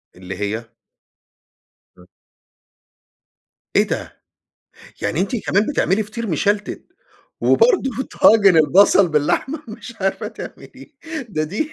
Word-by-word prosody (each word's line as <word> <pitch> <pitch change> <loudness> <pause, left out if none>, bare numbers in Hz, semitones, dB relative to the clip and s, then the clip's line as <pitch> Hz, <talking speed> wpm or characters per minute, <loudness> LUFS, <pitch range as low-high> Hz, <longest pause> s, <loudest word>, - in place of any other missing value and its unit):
اللي 90 +1 -8
هي؟ 110 +3 -4 1.3
امم. 90 0 -18 1.7
إيه - - +5
ده؟! - - -5 0.8
يعني 165 - -1
أنتِ 200 +5 -2
كمان 205 -1 0
بتعملي 215 -7 0
فطير 225 +2 -6
مشلتِت! 205 - -2 0.5
وبرضه 435 - +3 0.3
طاجن 200 -6 +6
البصل 195 +4 +5
باللحمة 205 - 0
مش 230 +1 -10
عارفة 195 0 -1
تعمليه؟ - - -11 0.4
ده 155 -5 -2
دي 215 - -3
200 Hz, 100 wpm, -20 LUFS, 155-225 Hz, 1.7 s, طاجن